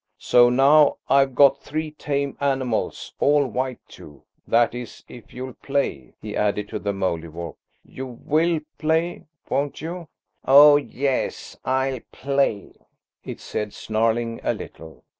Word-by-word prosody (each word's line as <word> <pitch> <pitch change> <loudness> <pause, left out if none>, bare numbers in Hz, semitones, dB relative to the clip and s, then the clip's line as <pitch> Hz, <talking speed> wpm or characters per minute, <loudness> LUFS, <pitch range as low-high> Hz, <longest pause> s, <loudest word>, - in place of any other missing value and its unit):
So 120 0 +5
now 140 +4 +5
I've 135 -1 +3
got 140 0 +5
three 155 +1 -4
tame 140 -2 -3
animals, 135 -4 -2
all 145 0 +3
white 130 +1 -3
too, 75 - -14 0.2
that 115 0 +3
is, 120 -1 -8
if 120 - -13
you'll 130 0 -7
play," 135 - -3
he - - -7
added 105 0 -1
to - - -4
the 100 - -2
Mouldiwarp. 85 -3 -4 0.3
"You 130 0 -8
will 155 +6 0 0.2
play, 160 +2 0 0.2
won't 140 0 -2
you?" 170 +2 -6 0.4
"Oh, 145 +2 +8
yes, 140 -2 -3
I'll 130 0 0
play!" 135 -7 -1 0.5
it - - -7
said, 105 -1 -4
snarling 115 +1 -1
a - - 0
little. 80 -5 -11
130 Hz, 135 wpm, -23 LUFS, 115-145 Hz, 0.5 s, Oh